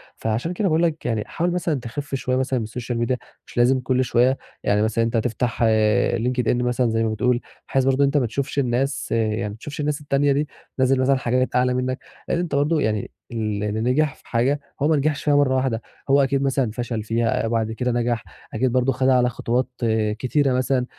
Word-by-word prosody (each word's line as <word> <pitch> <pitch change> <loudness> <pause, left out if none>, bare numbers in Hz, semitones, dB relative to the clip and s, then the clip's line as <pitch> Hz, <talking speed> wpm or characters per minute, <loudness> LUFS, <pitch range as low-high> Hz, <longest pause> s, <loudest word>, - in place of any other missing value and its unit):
فعشان 115 +10 -2
كده 200 +2 0
باقول 160 0 +2
لك 160 -2 -1
يعني 115 -3 0
حاول 175 +1 -1
مثلًا 170 -5 -1
تخِف 135 +4 -5
شوية 130 -1 -1
مثلًا 130 0 0
من - - -2
السوشيال 120 +2 -4
ميديا 120 +2 0 0.3
مش - - -14
لازم 125 +2 +4
كل 130 0 +1
شوية، 125 +2 +3 0.3
يعني 105 0 +2
مثلًا 110 +1 +1
أنت 115 +1 0
تفتح 120 +1 -1 0.5
LinkedIn 125 0 0
مثلًا 125 0 +1
زي 115 0 +1
ما 110 - +1
بتقول 120 +3 +1 0.3
بحيث 135 -1 +1
برضه 135 +1 +3
أنت 140 +1 +2
ما 135 - +2
تشوفش 135 +5 -2
الناس 135 +2 -1
يعني 110 -1 0
ما 105 - -7
تشوفش 145 +7 -8
الناس 150 0 -1
التانية 145 0 +2
دي. 145 +2 0 0.3
بتنزّل 130 0 +3
مثلًا 135 +1 +3
حاجات 130 0 0
أعلى 125 0 +3
منك، 125 +1 -1 0.3
لأن - - 0
أنت 175 -5 -2
برضه 150 +2 +2
يعني 105 -2 -1 0.2
اللي 105 -2 -2
ن 110 +1 -2
نجح 135 +4 +1
في - - -23
حاجة 130 +5 +1 0.2
هو 145 - +3
ما 160 - +3
نجِحش 145 +1 0
فيها 145 -1 +3
مرّة 140 -2 +3
واحدة، 130 -3 0 0.3
هو 140 +1 +5
أكيد 135 0 +1
مثلًا 135 -4 +1
فشَل 115 -1 -3
فيها 115 +1 0
وبعد 110 -1 0
كده 125 +2 -1
نجح، 120 -1 0 0.3
أكيد 125 +3 +1
برضه 130 +1 +2
خَدها 130 +1 +2
على 125 -1 +3
خطوات 125 +1 -1 0.5
كتيرة 135 +1 +1
مثلًا، 130 0 +1
125 Hz, 210 wpm, -22 LUFS, 115-140 Hz, 0.5 s, هو